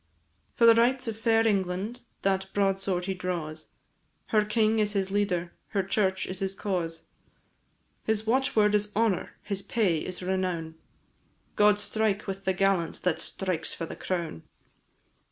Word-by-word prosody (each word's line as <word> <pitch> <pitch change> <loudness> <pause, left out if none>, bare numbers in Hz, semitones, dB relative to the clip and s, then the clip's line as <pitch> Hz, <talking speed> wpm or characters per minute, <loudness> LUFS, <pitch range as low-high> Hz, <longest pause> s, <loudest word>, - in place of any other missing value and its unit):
For 235 - +4
the 230 - +9
rights 245 +2 +2
of 225 - -2
fair 225 0 +3
England 200 +4 -1 0.2
that 190 0 +1
broadsword 195 -2 +1
he 190 - -1
draws, 170 -4 -4 0.6
Her 215 -1 +4
king 215 +1 +2
is 210 -1 +1
his 195 -1 -1
leader, 180 -4 0 0.2
her 195 -2 0
church 190 -1 +1
is 185 0 -5
his 195 -1 -2
cause, 170 -5 -3 1.0
His 220 0 +1
watchword 225 -3 +3
is 210 0 +1
honour, 220 -4 +1
his 200 -2 -3
pay 195 -8 +1
is 185 +3 -6
renown, 180 -3 -1 0.8
God 210 0 +5
strike 210 0 0
with 195 0 -5
the 190 - +2
gallant 190 -3 +1
that 180 -3 +1
strikes 180 -4 -2
for 165 - -4
the - - -7
crown! 170 - -3
195 Hz, 150 wpm, -28 LUFS, 185-215 Hz, 1.0 s, the